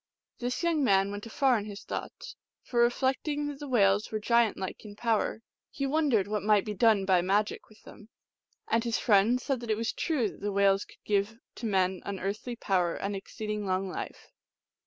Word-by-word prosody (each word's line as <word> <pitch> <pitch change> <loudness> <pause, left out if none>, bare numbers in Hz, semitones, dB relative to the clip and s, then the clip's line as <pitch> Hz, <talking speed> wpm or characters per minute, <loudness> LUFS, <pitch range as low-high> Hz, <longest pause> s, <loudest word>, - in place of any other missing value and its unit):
This 250 +6 -2
young 330 -4 +2
man 195 -4 +3
went 205 +2 -6
afar 250 +1 +2
in 205 - -6
his 205 -1 -8
thoughts; - - -6 0.3
for 240 -1 0
re 240 - +6
flecting 280 +4 -1
that 285 -1 -7
the 290 - -6
whales 205 -4 +3
were 215 - -1
giant 235 +1 +2
like 190 -1 -5
in 205 -2 -10
power, 225 0 0 0.3
he 275 - -3
wondered 270 -9 +2
what 210 0 -1
might 210 0 +3
be 210 - -3
done 210 -1 +3
by 185 -2 +4
magic 200 +4 0
with 215 - -20
them. 215 +1 -14 0.6
And 230 0 +1
his 235 -2 0
friend 215 +3 +4
said 265 -1 -2
that 235 -1 -8
it 215 - +1
was 225 0 -1
true 290 -9 0
that - - -10
the 205 0 -1
whales 195 0 +3
coidd - - -20
give 205 +2 0 0.2
to 230 - -5
man 190 -2 +1
unearthly 200 +5 -4
power 180 -6 0
and 200 +1 -3
exceeding 210 +1 -5
long 190 +1 0
life. - - -7
215 Hz, 200 wpm, -29 LUFS, 200-240 Hz, 0.6 s, re